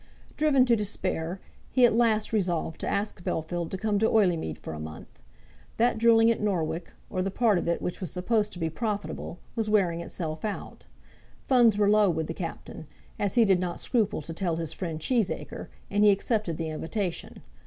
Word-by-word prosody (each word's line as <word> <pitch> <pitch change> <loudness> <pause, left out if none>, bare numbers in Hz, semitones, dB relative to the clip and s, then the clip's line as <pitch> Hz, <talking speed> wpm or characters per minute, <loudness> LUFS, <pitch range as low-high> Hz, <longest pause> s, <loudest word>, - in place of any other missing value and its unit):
Driven 285 -4 +4
to 240 -2 +4
despair, 190 -4 -2 0.3
he 255 -2 +5
at 235 - +4
last 225 -2 +2
resolved 175 -6 0
to - - -4
ask 200 -3 -2
Bellfield 170 +1 -2
to 190 - -4
come 205 +1 0
to 220 - +3
Oileymead 175 - +2
for - - -7
a 75 - -6
month. 80 -4 -9 0.6
That 235 -1 +2
drilling 230 0 +6
at 230 - -2
Norwich, 170 -4 -1 0.3
or 185 - -1
the 195 - 0
part 210 -1 +2
of - - -4
it 170 - 0
which 180 - -4
was 180 - -3
supposed 210 +3 0
to - - -9
be 165 -2 -2
profitable, 205 -3 -4 0.2
was 225 -2 -1
wearing 180 -5 +2
itself 160 -2 -5
out. 210 -2 -5 0.6
Funds 240 -5 +4
were 205 -1 +3
low 210 -1 +5
with 160 -2 -1
the 165 - -4
Captain, 165 -3 -7 0.3
as 205 +2 -1
he 235 -2 +6
did 190 -3 +4
not 180 -1 -3
scruple 215 - 0
to 165 - -6
tell 170 -1 -1
his 165 -1 -3
friend 165 -4 -4
Cheesacre, 220 +3 -1 0.2
and 205 +1 +3
he 210 - +7
accepted 200 -4 0
the 160 -1 -3
invitation. 170 +4 -4
195 Hz, 195 wpm, -27 LUFS, 165-220 Hz, 0.6 s, he